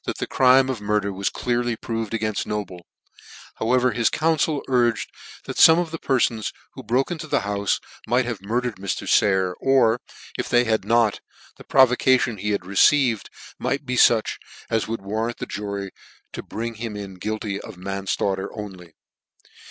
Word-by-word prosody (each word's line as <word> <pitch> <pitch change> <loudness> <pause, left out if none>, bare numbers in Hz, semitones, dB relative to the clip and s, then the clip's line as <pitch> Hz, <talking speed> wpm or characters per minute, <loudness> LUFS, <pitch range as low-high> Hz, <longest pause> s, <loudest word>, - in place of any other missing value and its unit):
the - - -2
crime 130 0 +4
of 130 -4 -3
the - - -12
murder 105 -1 0
was 95 +1 -1
clearly 120 -1 -1
proved 115 -1 -4
againft 110 -2 -2
Noble: 95 -5 -5 0.7
however 125 +2 +2
his 120 -1 +2
council 155 -2 0
urged 120 -3 +1 0.3
that - - -6
fome 160 0 +8
of 170 -2 -2
the 165 - -5
perfons 120 -5 0 0.2
who - - -9
broke 130 +7 0
into 160 -2 -5
the - - +1
houfe 100 0 -1 0.3
might 125 +3 +2
have 115 -5 -4
murdered 115 +2 -2
Mr. 100 0 -4
Sayer, 95 -2 +3
or, 125 -3 +3 0.4
if - - -2
they 120 0 +4
had 110 -4 0
not, 115 -1 +2 0.4
the - - -12
provocation 130 -2 +3
he 105 +2 -3
had 100 -3 -1
received 115 +4 +3 0.3
might 140 +1 -2
be 125 0 -2
fuch 115 -2 +3 0.3
as 110 -1 0
would 115 -2 -4
warrant 110 +4 -2
the - - -5
jury 100 -1 -5 0.4
in - - -7
bringing 115 0 -5
him 115 -3 -4
in 100 -2 -7
guilty 105 0 -3
of - - -11
manflaughter 95 0 -2
only. 95 -6 -9
115 Hz, 165 wpm, -23 LUFS, 100-125 Hz, 0.7 s, fome